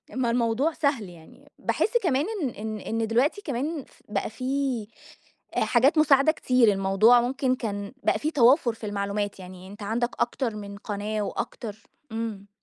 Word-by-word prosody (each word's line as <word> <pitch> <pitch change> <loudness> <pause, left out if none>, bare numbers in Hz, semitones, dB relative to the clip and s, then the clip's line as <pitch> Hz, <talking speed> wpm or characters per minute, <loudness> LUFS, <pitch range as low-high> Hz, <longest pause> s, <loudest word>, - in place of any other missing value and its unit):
ما 250 -3 +1
الموضوع 240 +6 +1
سهل 280 - 0
يعني. 165 -2 -16
باحس 475 +3 +1
كمان 295 -3 +2 0.2
إن 275 - 0
إن 215 -1 -5
إن 225 +2 -2
دلوقتي 265 - +1
كمان 290 +1 -3
ف - - -24
بقى - - -1
في 255 -1 -2 0.7
حاجات 265 +6 +3
مساعدة 280 -1 +5
كتير، 255 -6 +3
الموضوع 195 +5 +5
ممكن 255 +1 0
كان 205 -3 -4
بقى - - +2
في 310 - -1
توافر 250 -3 +4
في 225 - -9
المعلومات. 200 0 -2
يعني 185 0 -10
أنت 205 +2 -10
عندك 235 +4 0
أكتر 240 -5 -1
من 200 -1 -7
قناة 210 +1 -3
وأكتر 210 +1 -4 0.4
إمم. 220 -3 -4
230 Hz, 155 wpm, -26 LUFS, 205-270 Hz, 0.7 s, مساعدة